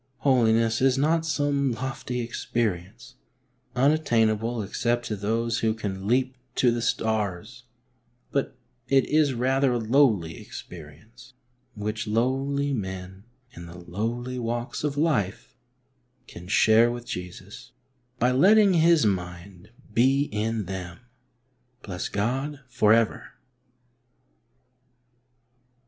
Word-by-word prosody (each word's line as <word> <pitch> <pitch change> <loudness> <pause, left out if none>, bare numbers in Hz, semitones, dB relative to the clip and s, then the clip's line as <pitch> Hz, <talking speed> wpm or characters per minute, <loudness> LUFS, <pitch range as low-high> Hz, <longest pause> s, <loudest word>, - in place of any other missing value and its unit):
Holiness 115 -4 +3
is 135 0 +3
not 160 +3 +1
some 145 -4 0
lofty 125 0 -4
experience, 110 -6 -3 0.6
unattainable 120 -5 +2
except 120 +4 -1
to 105 - -3
those 115 +3 -1
who 110 -1 +1
can 100 -3 -5
leap 130 +2 +1 0.2
to 125 - +3
the 120 0 -2
stars, 110 +1 -2 0.7
but 135 -2 -2 0.3
it 135 -1 +3
is 150 -3 +2
rathei 130 +2 +1
a 120 - +1
lowly 110 - +2
experience, 90 - -12 0.4
which 105 +1 -4
lowly 135 +5 0
men 95 -2 -6 0.3
in 85 0 -10
the 85 +1 -11
lowly 115 +8 -4
walks 120 +3 -3
of 145 -1 -2
life 140 - -1 0.7
can 85 +1 -11
share 110 +3 +5
with 120 0 -5
Jesus, 90 -4 -8 0.5
by 125 +1 +2
letting 195 +9 +5
His 165 -4 +4
mind 90 -1 -4 0.2
be 135 +5 +3
in 110 0 -2
them. 90 -2 -6 0.9
Bless 90 -3 -5
God 135 +7 -2
for 125 -4 +2
ever 115 0 +1
115 Hz, 110 wpm, -25 LUFS, 105-130 Hz, 0.9 s, share